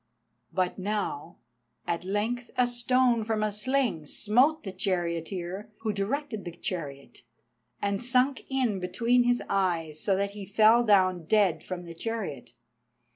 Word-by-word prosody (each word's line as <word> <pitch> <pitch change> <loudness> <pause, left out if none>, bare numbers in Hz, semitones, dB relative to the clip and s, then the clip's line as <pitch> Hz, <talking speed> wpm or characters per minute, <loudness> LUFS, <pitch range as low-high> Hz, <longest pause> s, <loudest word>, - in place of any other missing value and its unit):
But 185 0 -1
now 190 -5 -3 0.5
at 170 0 -2
length 220 +6 -2
a 250 - +5
stone 245 -1 +2
from 215 -1 -1
a 215 - 0
sling 210 - 0
smote 255 - +2
the 195 - -5
charioteer 180 +1 -2
who 220 -2 -1
directed 220 +3 -2
the 175 - -6
chariot, 140 -6 -5 0.6
and 200 0 0
sunk 255 +2 +2
in 255 -7 0
between 230 +7 +2
his 245 0 +2
eyes, 170 -6 0
so 195 - +2
that 200 +1 -1
he 205 0 -8
fell 220 +4 +5
down 185 -5 +3
dead 200 -2 +2
from 180 -1 -5
the 170 - -8
chariot. 165 - -5
205 Hz, 140 wpm, -28 LUFS, 180-240 Hz, 0.6 s, a